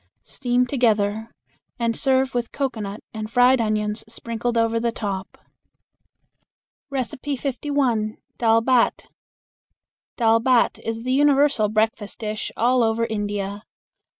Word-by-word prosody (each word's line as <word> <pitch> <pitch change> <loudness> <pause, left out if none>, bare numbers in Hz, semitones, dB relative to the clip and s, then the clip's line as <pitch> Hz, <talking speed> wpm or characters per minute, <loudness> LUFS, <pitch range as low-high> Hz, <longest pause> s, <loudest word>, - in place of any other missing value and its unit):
Steam 250 -1 0
together 220 -4 +1 0.5
and 230 -2 0
serve 265 -1 +1
with 240 -1 -2
cocoanut 220 -7 -3
and 215 -1 -5
fried 245 +1 +4
onions 210 -1 -1
sprinkled 230 +1 -3
over 230 0 +2
the 235 0 0
top. 195 -4 -5 1.5
51. 260 -3 -1 0.2
Dal 225 -1 +4
Bhat. 250 -1 +2 1.1
Dal 225 -1 +4
Bhat 245 0 +2
is 225 0 -4
the 255 +1 0
universal 280 -5 +3
breakfast 215 -1 -1
dish 215 -1 -4
all 250 +2 +3
over 225 0 +1
India. 205 -2 -3
230 Hz, 110 wpm, -23 LUFS, 215-255 Hz, 1.5 s, fried